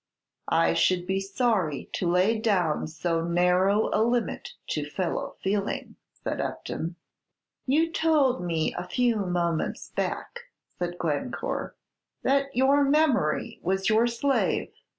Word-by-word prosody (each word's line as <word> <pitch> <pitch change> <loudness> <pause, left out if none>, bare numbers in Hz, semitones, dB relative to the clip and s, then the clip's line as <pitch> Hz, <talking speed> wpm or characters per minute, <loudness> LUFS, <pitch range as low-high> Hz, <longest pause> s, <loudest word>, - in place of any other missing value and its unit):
"I - - +3
should 180 -1 +2
be 190 +1 0
sorry 195 - 0
to 175 - 0
lay 185 +6 +3
down 185 -10 +1
so 165 +1 -1
narrow 180 +4 +2
a - - +3
limit 235 0 0 0.2
to 150 -1 -2
fellow 180 +3 -3
feeling," 200 +1 -2 0.3
said - - -2
Upton. 170 +2 -4 0.7
"You 320 +5 +2
told 300 -6 +2
me 165 -2 0
a 180 - -5
few 240 +2 +1
moments 175 -4 -1
back," 485 0 -4 0.3
said 175 0 -3
Glencore, 165 - -3 0.5
"that 275 0 +2
your 275 +3 +4
memory 280 - +2
was 190 +3 0
your 220 +2 +4
slave. 255 +4 0
195 Hz, 125 wpm, -27 LUFS, 175-245 Hz, 0.7 s, your